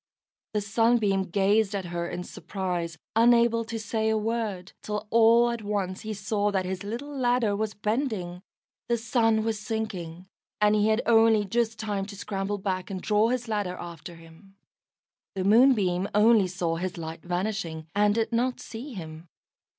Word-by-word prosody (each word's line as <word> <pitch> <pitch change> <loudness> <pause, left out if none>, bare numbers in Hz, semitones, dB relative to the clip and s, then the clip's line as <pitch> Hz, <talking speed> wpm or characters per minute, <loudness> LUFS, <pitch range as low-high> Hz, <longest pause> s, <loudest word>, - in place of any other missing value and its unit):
The 210 - +2
Sunbeam 205 -2 +2
gazed 200 +2 +2
at 195 -2 -3
her 170 0 -3
in 180 - -5
surprise, 180 -4 -4 0.2
unable 235 0 +4
to 230 0 -5
say 220 0 -1
a 220 - +2
word, 215 -4 -3
till 210 0 -4
all 230 +1 +5
at 235 -1 -4
once 200 -3 -2
he 215 0 -5
saw 205 +1 0
that 190 -2 -1
his 185 0 -4
little 245 +8 -5
ladder 245 -5 +1
was 215 +1 -2
bending. 210 -5 -2 0.5
The 235 - +2
sun 225 -1 +2
was 220 -1 -1
sinking, 190 -6 -5 0.3
and 210 0 +4
he 210 0 +3
had 220 +2 +2
only 225 -2 +5
just 225 +2 0
time 205 -3 -3
to 205 - -9
scramble 195 +1 -3
back, 190 -2 -3
and 190 -2 -4
draw 210 +3 +2
his 245 -1 -2
ladder 205 -4 -2
after 170 0 -8
him. 165 +4 -17 0.8
The 190 - -1
Moonbeam 205 -4 +4
only 210 -2 +5
saw 170 -2 -2
his 180 +1 -4
light 160 0 -6
vanishing, 175 -3 -3
and 205 0 +3
did 225 -1 0
not 245 +2 0
see 245 +5 -8
him. 160 -1 -8
210 Hz, 165 wpm, -27 LUFS, 185-225 Hz, 0.8 s, all